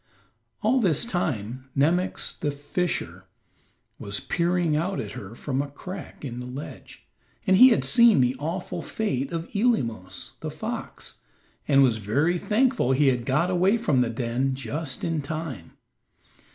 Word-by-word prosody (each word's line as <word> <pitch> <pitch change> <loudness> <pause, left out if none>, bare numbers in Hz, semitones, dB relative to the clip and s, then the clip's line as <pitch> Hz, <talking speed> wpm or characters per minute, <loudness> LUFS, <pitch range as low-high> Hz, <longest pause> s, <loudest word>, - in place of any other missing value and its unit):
All 250 +4 +3
this 180 -2 +2
time, 130 - -3
Nemox, 170 +6 +1
the 150 - -2
fisher, 145 +5 -3 0.7
was 100 0 -2
peering 175 -2 +1
out 180 +5 -1
at 105 - -4
her 100 +2 -8
from 135 +1 -2
a 145 - -4
crack 180 +2 -8
in 120 -2 -5
the 125 - -6
ledge, 130 +4 -9 0.4
and 190 -2 +5
he 255 +5 +10
had 230 - +2
seen 235 - +6
the 125 0 +3
awful 170 +5 -3
fate 140 - -2
of 165 0 -3
Eelemos, 115 - 0
the - - -4
fox, - - -6 0.5
and 140 -1 +6
was 120 -4 +3
very 145 - +1
thankful 235 - +2
he 140 +1 +4
had 120 -2 -1
got 150 +7 +2
away 185 +5 +3
from 150 - +2
the 120 - +1
den 120 +3 -1
just 140 +1 -4
in 165 -2 0
time. 140 - -6
145 Hz, 150 wpm, -26 LUFS, 130-180 Hz, 0.7 s, he